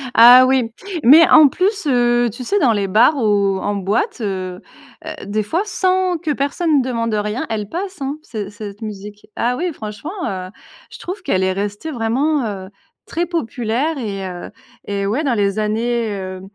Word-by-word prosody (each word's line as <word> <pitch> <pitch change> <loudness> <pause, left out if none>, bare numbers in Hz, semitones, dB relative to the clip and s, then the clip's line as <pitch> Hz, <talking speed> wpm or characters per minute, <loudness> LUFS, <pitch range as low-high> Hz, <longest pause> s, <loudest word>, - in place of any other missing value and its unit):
Ah 245 +3 +9
oui, 255 -3 +1 0.3
mais 310 +7 +8
en 310 -2 +8
plus, 390 - -1
heu, 240 -2 +2
tu 240 +4 -8
sais 405 +12 0
dans 250 -10 +3
les 200 -2 -1
bars 225 +10 +4
ou 200 -5 +1
en 205 +2 -2
boîte, 200 - -1
heu 205 -2 -1 0.7
heu, 315 -6 -7
des 210 +2 -1
fois 330 - -1
sans 370 -2 0
que 320 -1 -3
personne 290 +1 +1
demande 230 -3 -2
rien, 210 +3 -2
elle 210 -2 -3
passe, 375 - -5
hein 275 +2 -3
c 215 -9 -6
cette 205 0 -9
musique. 210 -1 -8
Ah 245 +2 0
oui, 355 +1 -2
franchement, 220 +6 -7 0.2
heu, 185 -1 -5 0.4
je - - -12
trouve 370 +3 -6
qu'elle 190 - 0
est 190 0 +1
restée 205 +10 -4
vraiment, 260 +4 0
heu, 195 -3 -5 0.4
très 340 +1 -2
populaire 275 -2 -2
et, 200 -6 -4
heu 175 -1 -8 0.3
et 200 -1 -2
ouais 225 +10 -1
dans 270 -5 +1
les 200 -1 0
années, 225 +2 -1
heu 185 -1 -6
230 Hz, 180 wpm, -18 LUFS, 205-300 Hz, 0.7 s, Ah